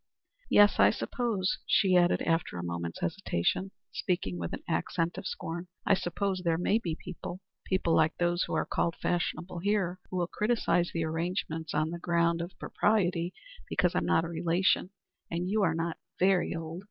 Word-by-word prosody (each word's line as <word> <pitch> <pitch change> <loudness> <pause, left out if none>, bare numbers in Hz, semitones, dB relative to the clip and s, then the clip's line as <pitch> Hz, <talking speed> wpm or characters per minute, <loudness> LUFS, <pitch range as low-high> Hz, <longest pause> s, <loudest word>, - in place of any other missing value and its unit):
"Yes. 205 0 +6
I - - +8
suppose," 225 -7 -1
she 190 -3 +4
added, 175 0 +4
after 165 - 0
a 85 - -4
moment's 85 -1 -4
hesitation 135 - 0 0.2
speaking 95 - -2
with 85 -1 -3
an - - -6
accent 165 +1 -1
of 190 - -5
scorn 170 +2 -5 0.2
"I - - +5
suppose 190 +1 -1
there 165 -2 +2
may 200 +5 +2
be 170 -7 -3
people 180 +1 -7 0.3
people 185 -3 +1
like 160 0 +3
those 175 0 +1
who - - -3
are - - +1
called 170 - 0
fashionable 175 0 -2
here 190 -1 0
who 185 - -3
will 175 - +2
criticise 210 -3 +1
the 165 -1 -1
arrangement 160 -1 -2
on 155 +1 +1
the 170 - -5
ground 170 -1 +2
er - - -1
of 180 - -15
propriety, 180 -5 +1 0.4
because - - +2
I'm - - 0
not 165 - +3
a - - -5
relation, 170 +2 +1 0.4
and 170 +1 -2
you 215 0 +2
are 165 -5 +2
not 165 0 -2 0.2
very 185 -2 +3
old. 165 +1 -5
175 Hz, 180 wpm, -30 LUFS, 165-185 Hz, 0.4 s, I